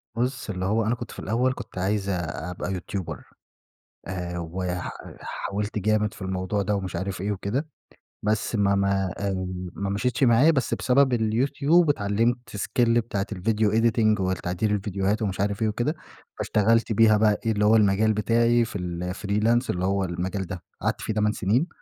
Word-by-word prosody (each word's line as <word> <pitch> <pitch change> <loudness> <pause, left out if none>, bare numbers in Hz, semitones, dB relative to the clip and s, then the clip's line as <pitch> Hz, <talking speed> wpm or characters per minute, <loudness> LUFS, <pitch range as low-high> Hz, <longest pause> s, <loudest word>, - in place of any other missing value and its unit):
بُصّ 125 0 -2
اللي 95 -1 -2
هو 110 +2 +1
أنا 115 +2 +1
كنت - - -8
في - - -9
الأوّل 125 +5 +1
كنت - - -10
عايز 100 +1 0
أبقى 90 +1 -3
يوتيوبر، 95 0 -5 0.8
آآ، 90 -1 -4
وح 90 +1 -3 0.3
حاولت 105 +2 -4
جامد 105 +1 +1
في - - -14
الموضوع 95 +2 -1
ده، 100 +2 0
ومش 95 -3 -4
عارف 95 +1 -3
إيه 105 +1 -1
وكده، 105 - -2 0.6
بس 110 +2 0
ما 100 -1 +3
ما 100 -1 +1
آآ، 100 -1 -1 0.4
ما 100 0 -3
مشيتش 120 +5 0
معايا، 125 +6 +6
بس 135 -6 0
بسبب 130 0 +3
اليوتيوب 140 +9 +2
اتعلمت 115 0 +1 0.2
skill 120 +4 +1
بتاعة 100 -3 -2
الvideo 105 +2 +1
editing، 110 -2 +3
والتعديل 95 +2 0
الڤيديوهات 100 +2 -1
ومش 95 -4 -2
عارف 100 +1 -1
إيه 110 - +3
وكده، 120 +9 -1 0.4
فاشتغلت 115 +2 +2
بيها 110 0 +5
بقى 105 -1 +3
إيه 115 - +2
اللي 105 0 +1
هو 110 +2 +6
المجال 105 +1 +4
بتاعي 115 +3 +3
في 105 - -5
الFreelance 100 +7 0
اللي 90 +1 0
هو 95 0 +1
المجال 90 +2 -3
ده، 90 -4 -6 0.2
قعدت - - -1
في 110 - -2
8 105 0 +2
سنين. 110 - +1
105 Hz, 170 wpm, -25 LUFS, 95-115 Hz, 0.8 s, معايا